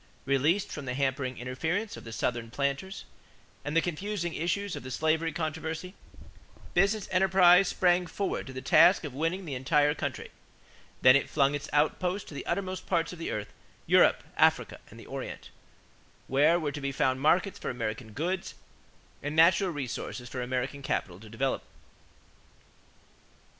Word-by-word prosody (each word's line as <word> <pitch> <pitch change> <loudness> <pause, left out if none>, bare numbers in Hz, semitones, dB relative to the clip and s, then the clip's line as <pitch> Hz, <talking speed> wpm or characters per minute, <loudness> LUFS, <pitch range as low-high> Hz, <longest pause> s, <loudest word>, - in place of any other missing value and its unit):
Released 145 +8 +1
from 145 - -6
the 125 -1 -3
hampering 130 -1 -1
interference 160 - -3
of - - -11
the 115 - -8
Southern 115 0 -2
planters 140 - -3 0.6
and 145 +2 -1
the - - +5
confusing 175 0 -3
issues 185 +4 -2
of - - -6
the 130 - -8
slavery 160 +4 0
controversy, 160 +3 -4 0.8
business 200 +3 +2
enterprise 185 0 +5
sprang 180 -1 +2
forward 195 -1 -3
to - - -7
the 130 - -7
task 180 - +6
of 145 -4 -6
winning 165 +7 -2
the 150 - -5
entire 145 +3 +2
country. - - -5 0.7
Then 130 +1 +8
it 140 - +1
flung 140 -1 +2
its 145 0 -4
outposts 180 +6 0
to - - -10
the 140 - -7
uttermost 185 -1 -3
parts 170 -1 0
of 175 - -10
the 165 - -4
earth 105 -1 -5 0.3
Europe, - - +4
Africa, - - +2
and - - -13
the - - -12
Orient - - -7 0.7
where 150 +6 +3
were 150 -3 -2
to 145 +1 -6
be 140 0 -2
found 130 -1 0
markets 175 +6 +2
for - - -4
American 110 -2 -4
goods 175 - -3 0.7
and 145 +2 -4
natural 170 +4 +5
resources 130 -4 -5
for 125 +1 -5
American 130 +3 -3
capital 95 -8 -3
to 110 +1 -13
develop. 130 +5 -1
150 Hz, 160 wpm, -29 LUFS, 130-180 Hz, 0.8 s, Then